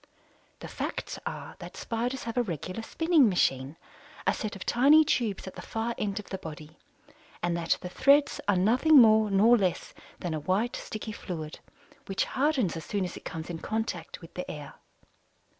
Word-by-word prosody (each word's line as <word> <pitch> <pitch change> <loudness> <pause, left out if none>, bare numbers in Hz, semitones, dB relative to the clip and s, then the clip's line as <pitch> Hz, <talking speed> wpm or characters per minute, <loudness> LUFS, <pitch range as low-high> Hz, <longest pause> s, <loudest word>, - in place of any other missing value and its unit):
The - - -6
facts - - -5
are - - -6
that - - -9
Spiders 245 +3 -3
have 230 -1 -5
a 245 - +3
regular 185 - -4
spinning 320 0 +3
machine 135 -5 0 0.5
a - - +3
set 215 -2 -4
of 185 - -8
tiny 290 +6 +6
tubes 225 -8 0
at 190 - -7
the - - -8
far 225 +1 -3
end 200 -2 -2
of 210 - -7
the 190 - -3
body 155 -2 -10 0.6
and 175 0 +1
that 170 -1 +1
the 180 - -5
threads 280 +7 +3
are 205 - +4
nothing 245 +12 +5
more 220 -2 +6
nor 210 +5 +6
less 185 -3 -1 0.2
than 175 -3 -4
a 155 - -2
white, 190 +10 0
sticky 215 0 -6
fluid, 160 -6 -6 0.5
which 195 0 0
hardens 265 - +1
as 165 - -5
soon 200 -3 -1
as 180 - -6
it - - -11
comes 160 +2 -5
in 165 - -5
contact 215 -7 -4
with 165 - -13
the 180 - -5
air. 145 -2 -7
205 Hz, 185 wpm, -28 LUFS, 175-235 Hz, 0.6 s, tiny